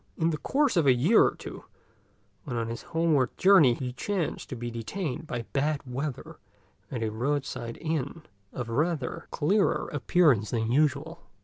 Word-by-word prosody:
In 165 0 +2
the 155 - -3
course 285 -3 +1
of 160 -4 +3
a 130 - +6
year 160 - +5
or - - +1
two, - - -9 0.8
when 125 -5 -3
on 115 -1 -2
his 115 0 -5
homeward 160 -6 +1
journey, 180 -10 +6
he 125 0 -5
chanced 190 +3 -3
to 130 - -4
be 120 0 -5
detained 155 - -4
by 120 -4 -3
bad 145 +1 0
weather 140 +4 -5 0.5
at 120 -3 -3
a 110 - -1
roadside 120 0 -2
inn 155 -1 -3 0.3
of 125 -3 -5
rather 145 +2 -1
cleaner 195 +7 +1
appearance 145 - +3
than 115 -1 -1
usual. 155 +4 +1
145 Hz, 165 wpm, -28 LUFS, 120-165 Hz, 0.8 s, a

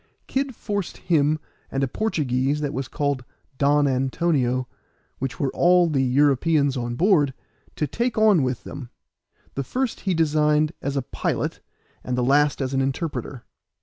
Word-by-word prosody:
Kid 270 -1 -2
forced 205 -4 -4
him 155 -3 +2 0.3
and 135 0 -1
a - - +2
Portuguese 140 - 0
that 145 -1 -2
was 135 -3 -3
called 140 -3 -1 0.4
Don 145 +1 +4
Antonio, 130 -1 0 0.5
which 135 0 -4
were 135 - 0
all 175 0 +4
the 145 -4 +1
Europeans 140 +2 +3
on 120 -1 -3
board, 150 - +3 0.4
to 150 - 0
take 235 - -2
on 215 -6 +5
with 130 -2 -2
them; 125 -4 -8 0.6
the 140 - -2
first 255 - -2
he 190 -3 -1
designed 150 -1 +2
as 140 0 -2
a 135 - 0
pilot, - - -2 0.4
and 125 0 -2
the 125 - +1
last 145 +3 +3
as 130 0 -3
an 135 - +2
interpreter. 135 -2 -3
145 Hz, 155 wpm, -23 LUFS, 130-165 Hz, 0.6 s, on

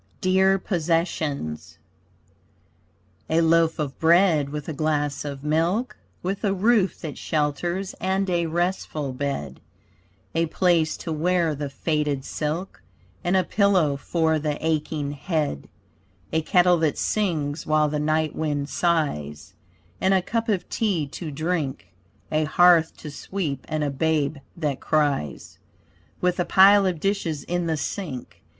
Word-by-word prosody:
DEAR 190 +1 +3
POSSESSIONS 165 - -2 1.5
A 160 - +3
loaf 165 0 +3
of 145 -3 -4
bread 165 -3 +4
with 150 0 -6
a 160 - -3
glass 145 -1 -1
of 140 -2 -6
milk 170 +11 0 0.3
With 195 +4 -3
a 195 -2 +1
roof 205 0 +2
that 155 -4 -6
shelters 170 +5 -1
and 190 +1 0
a 170 -2 0
restful 160 -4 -2
bed, 130 - -4 0.7
A 165 0 +1
place 170 -2 +2
to 165 - -3
wear 170 0 +1
the 145 0 -4
faded 145 -1 -1
silk 160 +5 -4 0.4
And 180 +2 +2
a 185 - +3
pillow 185 -7 +2
for 160 +3 0
the 150 -1 -2
aching 155 -2 -1
head; 145 - -2 0.6
A 160 - +2
kettle 180 +2 +4
that 160 -2 +1
sings 160 -8 -1
while 155 0 +3
the 150 0 -2
night 155 0 0
wind 145 -2 -2
sighs, 100 - -1 0.5
And 190 +1 +3
a 185 - +2
cup 230 +3 -2
of 185 -4 0
tea 195 -9 0
to 160 +2 -6
drink; 145 - -3 0.4
A 155 0 +2
hearth 170 0 +4
to 150 - -8
sweep 145 -3 -4
and 155 -1 -1
a 145 - -1
babe 150 0 0 0.2
that 150 -5 -2
cries, 145 - -1 0.6
With 180 0 0
a - - +3
pile 195 +1 +6
of 175 -4 -1
dishes 180 -6 -1
in 175 -1 -2
the 160 -1 0
sink. 150 -3 -5
160 Hz, 140 wpm, -24 LUFS, 145-180 Hz, 1.5 s, pile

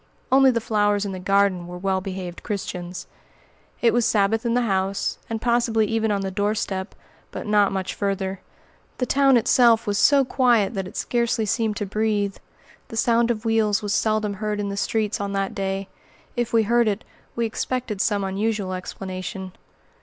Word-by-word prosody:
Only 265 0 +6
the 235 -2 +1
flowers 205 -2 +1
in 200 - -3
the 185 - -5
garden 195 -2 +2
were 180 0 -7
well 190 +1 0
behaved 185 -2 -6
Christians. 180 -4 -5 0.8
It 230 - +5
was 240 0 +3
Sabbath 220 +2 +2
in 235 - +1
the 245 - +2
house, 195 -2 -1
and 225 -1 -2
possibly 235 -2 +2
even 225 +1 0
on 200 -1 0
the 195 0 -3
doorstep; 205 -1 -2 0.3
but - - -7
not 210 -2 +3
much 190 -1 -3
farther. 195 -1 -2 0.6
The 250 - 0
town 275 -1 +4
itself 235 0 +4
was 205 -2 0
so 280 -2 +5
quiet 240 -6 +2
that 195 -3 -3
it - - -9
scarcely 235 -2 0
seemed 215 +1 0
to 210 - -2
breathe. 205 -1 -1 0.5
The 225 - -7
sound 235 +1 +3
of 225 -1 -2
wheels 220 -2 +2
was 205 0 -1
seldom 215 -1 +1
heard 210 +1 -3
in 205 -1 -2
the 200 - -4
streets 215 +1 -1
on 200 0 -3
that 195 0 -1
day; 195 0 -3 0.5
if 240 -1 -1
we 225 -1 +4
heard 235 +2 +3
it, 210 +1 -1 0.3
we 235 - 0
expected 230 -2 -2
some 205 -2 +1
unusual 195 0 -1
explanation. 185 0 -6
210 Hz, 180 wpm, -23 LUFS, 195-230 Hz, 0.8 s, Only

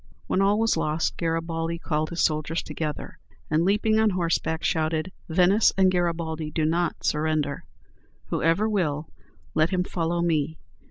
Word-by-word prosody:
When 190 - +1
all 200 +1 +3
was 225 +1 +2
lost, 155 +1 0
Garibaldi 165 0 -2
called 155 -2 -2
his 170 - -1
soldiers 155 +1 0
together, 155 -2 -5 0.3
and, 155 +2 +3
leaping 210 +3 +2
on 220 -1 +4
horseback, 170 -3 -1
shouted, 160 +2 0 0.2
"Venice 185 +6 +4
and 190 -1 +5
Garibaldi 165 -3 -1
do 155 0 -1
not 170 +1 0
surrender. 150 -2 0 0.6
Whoever 165 +7 +2
will, 160 -8 -1 0.4
let 155 +1 +3
him 180 -1 +1
follow 170 -1 -1
me! 160 -2 0
165 Hz, 145 wpm, -25 LUFS, 155-180 Hz, 0.6 s, and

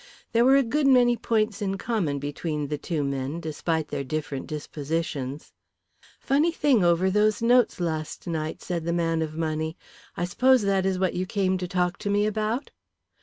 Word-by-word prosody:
There 230 +1 +4
were 265 +2 +6
a 275 - +5
good 275 +4 +1
many 245 -2 +5
points 220 -2 0
in 195 -1 -1
common 190 -10 -1
between 145 +1 -3
the 150 - -2
two 155 -1 -2
men 140 +3 -3
despite 160 0 -2
their 140 - -3
different 145 -1 -4
dispositions. 150 -2 -4 0.7
"Funny 295 +5 +2
thing 285 - +2
over 175 +2 +3
those 215 +2 +2
notes 240 -3 +4
last 160 -3 -3
night," 160 -2 -3
said 170 -3 -3
the 170 - 0
man 165 -1 0
of 155 -1 -3
money. 160 0 -2 0.4
"I 175 - 0
suppose 255 +6 +3
that 195 -1 +1
is 190 -1 0
what 185 -1 0
you 185 +1 -2
came 190 -1 +1
to 180 - -3
talk 180 +1 -1
to 205 - -3
me 205 +1 +2
about." 215 +5 -2
180 Hz, 180 wpm, -26 LUFS, 155-215 Hz, 0.7 s, were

